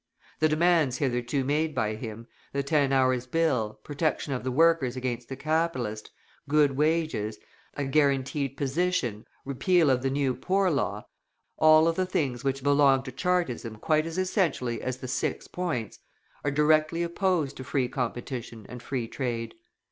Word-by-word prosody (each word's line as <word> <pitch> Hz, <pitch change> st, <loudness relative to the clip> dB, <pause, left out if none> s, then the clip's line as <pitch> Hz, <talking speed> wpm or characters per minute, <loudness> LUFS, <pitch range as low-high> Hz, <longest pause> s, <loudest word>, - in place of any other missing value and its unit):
The 155 Hz, -, +3 dB
demands 155 Hz, -4 st, +3 dB
hitherto 125 Hz, -1 st, -1 dB
made 150 Hz, +3 st, 0 dB
by 110 Hz, 0 st, 0 dB
him, 110 Hz, +1 st, -7 dB, 0.3 s
the 140 Hz, 0 st, 0 dB
Ten 140 Hz, -1 st, +2 dB
Hours' 130 Hz, -2 st, +2 dB
Bill, 130 Hz, -9 st, 0 dB
protection 145 Hz, -1 st, -1 dB
of 125 Hz, -, -3 dB
the 130 Hz, -, -1 dB
workers 150 Hz, -2 st, +3 dB
against 125 Hz, -2 st, -4 dB
the 135 Hz, -, -4 dB
capitalist, 135 Hz, -8 st, -1 dB, 0.4 s
good 150 Hz, -1 st, +4 dB
wages, 150 Hz, -7 st, 0 dB, 0.4 s
a 145 Hz, -, -2 dB
guaranteed 140 Hz, -1 st, +1 dB
position, 140 Hz, -, -1 dB, 0.2 s
repeal 145 Hz, +3 st, +3 dB
of 125 Hz, -1 st, +2 dB
the 135 Hz, -, 0 dB
new 135 Hz, -1 st, 0 dB
Poor 185 Hz, +9 st, +1 dB
Law, 105 Hz, -8 st, -1 dB, 0.5 s
all 155 Hz, +1 st, +6 dB
of 165 Hz, -, 0 dB
the 185 Hz, -1 st, +1 dB
things 130 Hz, -9 st, -1 dB
which 135 Hz, -1 st, -1 dB
belong 140 Hz, -2 st, +4 dB
to 130 Hz, -, -7 dB
Chartism 135 Hz, -7 st, -1 dB
quite 155 Hz, +8 st, +1 dB
as 165 Hz, +1 st, -6 dB
essentially 175 Hz, -, 0 dB
as 130 Hz, 0 st, -3 dB
the 130 Hz, -, -7 dB
"Six 125 Hz, -, -2 dB
Points," 165 Hz, -, -3 dB, 0.4 s
are 145 Hz, -, +1 dB
directly 155 Hz, +3 st, +2 dB
opposed 170 Hz, -5 st, 0 dB
to 130 Hz, -, -6 dB
free 130 Hz, -1 st, 0 dB
competition 120 Hz, -3 st, -5 dB
and 125 Hz, -1 st, -9 dB
Free 125 Hz, -3 st, -3 dB
Trade. 120 Hz, -2 st, -3 dB
140 Hz, 155 wpm, -27 LUFS, 125-155 Hz, 0.5 s, all